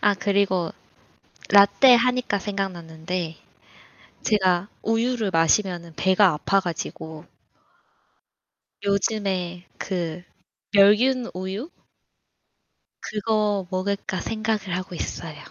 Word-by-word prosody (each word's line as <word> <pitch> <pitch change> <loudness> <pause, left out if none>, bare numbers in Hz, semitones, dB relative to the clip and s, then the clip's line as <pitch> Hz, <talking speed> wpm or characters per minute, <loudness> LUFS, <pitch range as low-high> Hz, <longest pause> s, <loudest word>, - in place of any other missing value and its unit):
아 205 -1 +3
그리고 190 -2 +1 0.8
라테 200 +6 +7
하니까 245 -3 +1
생각났는데 175 -4 -4 0.9
제가 190 -3 +2
우유를 225 -1 0
마시면은 170 0 +1
배가 190 +5 +4
아파 195 +6 +1
가지고. 160 -3 -6 1.6
요즘에 195 -3 -1
그 175 -3 -4 0.5
멸균 235 +5 +4
우유 190 - -5 1.3
그거 210 -2 -1
먹을까 195 0 -2
생각을 215 -4 -2
하고 185 0 -6
있어요. 165 -2 -5
195 Hz, 195 characters per minute, -24 LUFS, 180-210 Hz, 1.6 s, 라테